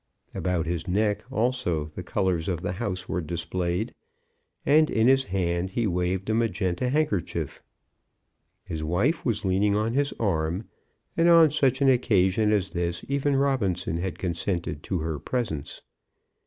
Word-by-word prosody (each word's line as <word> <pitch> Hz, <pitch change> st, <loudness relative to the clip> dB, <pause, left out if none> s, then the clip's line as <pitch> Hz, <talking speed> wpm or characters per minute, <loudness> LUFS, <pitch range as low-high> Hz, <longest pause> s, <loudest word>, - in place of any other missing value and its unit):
About 90 Hz, -3 st, -1 dB
his 85 Hz, +1 st, -3 dB
neck 105 Hz, +3 st, +1 dB
also 110 Hz, -10 st, 0 dB
the 75 Hz, +4 st, -8 dB
colours 90 Hz, -1 st, -1 dB
of 90 Hz, -3 st, -1 dB
the -, -, -2 dB
house 90 Hz, 0 st, -3 dB
were 90 Hz, -, -1 dB
displayed, 85 Hz, +5 st, -2 dB, 0.7 s
and 155 Hz, +2 st, +5 dB
in 110 Hz, +1 st, +2 dB
his 135 Hz, 0 st, +4 dB
hand 90 Hz, -1 st, -1 dB
he 115 Hz, +4 st, -1 dB
waved 90 Hz, 0 st, -1 dB
a 110 Hz, -, +1 dB
magenta 110 Hz, -1 st, 0 dB
handkerchief. 135 Hz, -, -1 dB, 1.0 s
His 80 Hz, -1 st, -5 dB
wife 100 Hz, -, +1 dB
was 110 Hz, -4 st, 0 dB
leaning 100 Hz, +2 st, +2 dB
on 110 Hz, +2 st, 0 dB
his 140 Hz, +2 st, +1 dB
arm, 90 Hz, -1 st, -1 dB, 0.5 s
and 170 Hz, +1 st, +4 dB
on 165 Hz, -3 st, +7 dB
such 135 Hz, -2 st, +2 dB
an 135 Hz, -, +5 dB
occasion 105 Hz, -4 st, +3 dB
as 95 Hz, -3 st, +1 dB
this 85 Hz, 0 st, -2 dB
even 140 Hz, 0 st, +1 dB
Robinson 100 Hz, -, 0 dB
had 90 Hz, +1 st, -3 dB
consented 85 Hz, -3 st, -2 dB
to 95 Hz, -, -2 dB
her 80 Hz, -2 st, -3 dB
presence. 110 Hz, -, -3 dB
95 Hz, 150 wpm, -26 LUFS, 85-120 Hz, 1.0 s, on